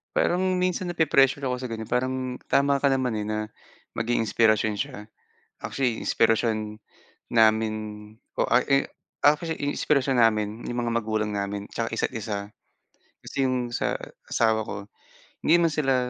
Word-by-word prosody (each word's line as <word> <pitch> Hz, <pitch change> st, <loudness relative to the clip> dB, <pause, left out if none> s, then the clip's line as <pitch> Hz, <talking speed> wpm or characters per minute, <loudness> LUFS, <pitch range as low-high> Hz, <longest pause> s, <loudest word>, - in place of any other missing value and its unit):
Parang 185 Hz, +1 st, +2 dB
minsan 180 Hz, 0 st, 0 dB
nape-pressure 140 Hz, -4 st, +3 dB
ako 125 Hz, -1 st, 0 dB
sa 125 Hz, -, -4 dB
ganyan, 110 Hz, -1 st, -5 dB
parang 130 Hz, +1 st, -2 dB
tama 140 Hz, 0 st, +3 dB
ka 140 Hz, -, +4 dB
naman, 130 Hz, -3 st, +1 dB
eh, 105 Hz, -1 st, -2 dB
na 110 Hz, 0 st, -1 dB, 0.5 s
maging 115 Hz, 0 st, 0 dB
inspirasyon 110 Hz, -1 st, +3 dB
siya, 130 Hz, -4 st, -5 dB, 0.5 s
actually 125 Hz, -4 st, -1 dB
inspirasyon 110 Hz, -1 st, +1 dB, 0.5 s
namin 110 Hz, -1 st, +4 dB, 0.6 s
o -, -, +2 dB
a 120 Hz, -, +5 dB
i 140 Hz, 0 st, +4 dB, 0.4 s
actually 155 Hz, +3 st, +3 dB, 0.2 s
inspirasyon 135 Hz, -3 st, +1 dB
namin 110 Hz, 0 st, +2 dB
yung 120 Hz, -, -3 dB
mga 115 Hz, -, -1 dB
magulang 110 Hz, -1 st, -1 dB
namin 100 Hz, 0 st, -3 dB
tiyaka 115 Hz, -1 st, -3 dB
isa't -, -, -1 dB
isa. 110 Hz, -3 st, -3 dB, 0.9 s
Kasi 135 Hz, -, -1 dB
yung 125 Hz, -2 st, -1 dB
sa -, -, 0 dB, 0.3 s
asawa 110 Hz, -1 st, +2 dB
ko 105 Hz, -, -5 dB, 0.7 s
hindi 170 Hz, -, +5 dB
man 165 Hz, -2 st, +2 dB
sila, 135 Hz, -4 st, +2 dB
120 Hz, 145 wpm, -26 LUFS, 110-140 Hz, 0.9 s, a